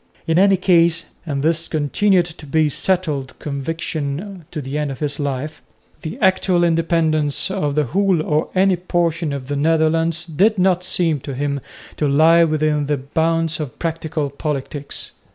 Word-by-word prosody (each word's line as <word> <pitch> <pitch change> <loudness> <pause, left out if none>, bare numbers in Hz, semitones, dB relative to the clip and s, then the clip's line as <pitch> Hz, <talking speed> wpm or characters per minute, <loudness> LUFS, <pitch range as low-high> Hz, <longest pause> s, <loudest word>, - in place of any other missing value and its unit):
In 165 +1 +2
any 195 0 +5
case 170 -2 +3 0.2
and 140 -2 -2
this 165 +1 +1
continued 175 +5 +2
to 160 -3 -10
be 160 +3 +2
his 150 -3 +1
settled 155 -8 -1
conviction 155 +4 -4
to 155 - -5
the 140 +1 -4
end 150 -1 -1
of 135 - -5
his 145 +1 -2
life 145 +1 -3 0.4
the 160 +9 -6
actual 185 -3 +3
independence 165 -2 +1
of 150 -7 -1
the 150 - +3
whole 190 +5 +1
or 155 0 0
any 190 0 +3
portion 170 -3 -1
of 140 -2 -5
the 145 - -2
Netherlands 165 +2 +1
did 190 +7 +2
not 185 -1 +2
seem 165 -5 0
to 135 +1 -6
him 140 +1 -1 0.4
to 150 - +1
lie 160 +4 +5
within 155 -2 +1
the 145 -1 +1
bounds 165 +4 0
of 150 -5 -5
practical 160 -3 -3
politics. 140 0 -5
160 Hz, 165 wpm, -20 LUFS, 145-170 Hz, 0.4 s, any